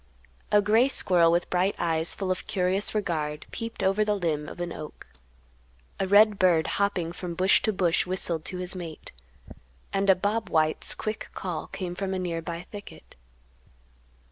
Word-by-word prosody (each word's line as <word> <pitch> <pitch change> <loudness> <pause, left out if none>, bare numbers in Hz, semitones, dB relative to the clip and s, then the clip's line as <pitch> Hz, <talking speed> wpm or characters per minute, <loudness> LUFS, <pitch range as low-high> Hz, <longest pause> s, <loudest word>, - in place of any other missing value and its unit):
A 205 0 +5
gray 220 +5 +4
squirrel 175 -10 +3
with 175 +1 0
bright 185 +2 +1
eyes 165 -1 +1
full 190 -2 -2
of 185 - -3
curious 195 0 0
regard 155 -7 -2
peeped 230 0 -5
over 195 +3 +3
the 210 0 +1
limb 160 -6 -2
of - - -10
an 175 -1 -3
oak; 150 - -9 0.9
a 195 - 0
red 205 +1 +5
bird 175 -4 +4
hopping 195 -5 0
from 175 0 -6
bush 185 +3 +4
to 220 - +1
bush 180 -4 +1
whistled 175 -3 -2
to 185 - -4
his 180 +1 -3
mate; 170 -4 -8 0.8
and 195 0 +1
a 190 - +8
bob 205 +4 -1
white's 155 -1 +1
quick 215 0 -4
call 180 -4 -4
came 180 -2 -5
from 190 +1 -3
a - - -1
nearby 170 -1 -4
thicket. 205 +2 -12
185 Hz, 170 wpm, -27 LUFS, 170-200 Hz, 0.9 s, a